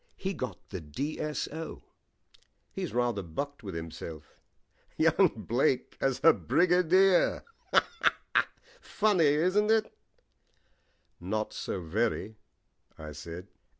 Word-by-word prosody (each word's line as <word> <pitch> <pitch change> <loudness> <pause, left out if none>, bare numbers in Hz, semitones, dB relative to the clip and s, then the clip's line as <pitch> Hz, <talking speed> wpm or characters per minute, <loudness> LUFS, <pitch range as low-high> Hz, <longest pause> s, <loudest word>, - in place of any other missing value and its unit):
He 190 +1 -3
got 105 - -6
the 95 -4 -5
D.S.O. 150 - -4 0.9
He's - - -4
rather 120 -3 0
bucked 135 - -5
with 100 -6 -7
himself. 80 -1 -8 0.6
Young - - +4
Blake 130 +2 +1
as 135 -1 +1
a 165 - +8
Brigadier 180 +1 +3 1.4
funny, 205 -6 +2
isn't 185 +9 +3
it?" 220 -1 +2 1.2
"Not 105 +4 -3
so 95 - -4
very," 110 +4 -1 0.6
I 75 -1 -8
said. 85 +5 -8
125 Hz, 95 wpm, -29 LUFS, -, 1.4 s, a